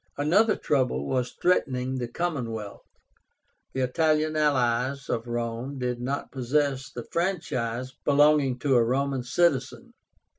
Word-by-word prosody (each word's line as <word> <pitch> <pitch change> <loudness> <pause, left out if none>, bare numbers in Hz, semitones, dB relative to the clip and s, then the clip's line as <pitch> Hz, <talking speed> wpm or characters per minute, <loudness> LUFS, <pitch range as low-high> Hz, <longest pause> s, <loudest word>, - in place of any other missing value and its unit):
Another 195 +10 +3
trouble 130 -4 0
was 125 -2 -1
threatening 130 -7 +1
the 120 - -2
commonwealth. 120 -8 -4 0.9
The 130 - -1
Italian 155 +3 +1
allies 135 -2 +1
of 115 +1 -2
Rome 120 +3 -3
did 125 -1 -2
not 135 +3 -3
possess 135 +1 0
the 120 - -7
franchise 130 -9 -2
belonging 145 -2 +4
to 140 -2 +2
a 120 - +5
Roman 135 +2 0
citizen. 140 +2 0
130 Hz, 120 wpm, -26 LUFS, 125-150 Hz, 0.9 s, a